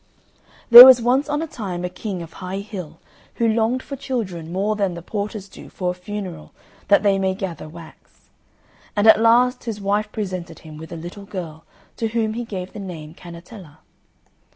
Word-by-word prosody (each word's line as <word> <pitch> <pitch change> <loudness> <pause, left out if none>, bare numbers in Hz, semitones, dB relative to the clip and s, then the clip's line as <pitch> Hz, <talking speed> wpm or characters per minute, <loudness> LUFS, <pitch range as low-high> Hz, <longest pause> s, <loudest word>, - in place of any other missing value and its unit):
There 240 +1 +14
was 260 -1 +9
once 255 +5 +1
on 295 +2 -1
a - - -5
time 185 - -5
a - - -1
King 185 0 -6
of 165 - -13
High 190 +1 -6
Hill 180 -7 -9 0.4
who 230 - +1
longed 225 +3 0
for 280 - -7
children 190 -12 -5
more 200 +4 -1
than 195 -4 -1
the 170 - -9
porters 205 0 -5
do - - -13
for 180 -1 -3
a - - -5
funeral 180 -3 -8 0.3
that 200 - +4
they 200 -1 +2
may 190 -1 0
gather 180 -6 -6
wax. 165 0 -16 0.6
And 205 0 +1
at 220 0 +7
last 245 +2 +3
his 220 -3 -4
wife 205 +1 -1
presented 185 -5 -5
him 155 -1 -11
with 160 0 -11
a - - -6
little 175 +5 -9
girl, 165 -5 -8 0.3
to 225 - -1
whom 220 -1 -1
he 240 +1 -5
gave 185 -4 -7
the - - -8
name 165 -6 -8
Cannetella. 170 -1 -13
200 Hz, 190 wpm, -21 LUFS, 175-225 Hz, 0.6 s, There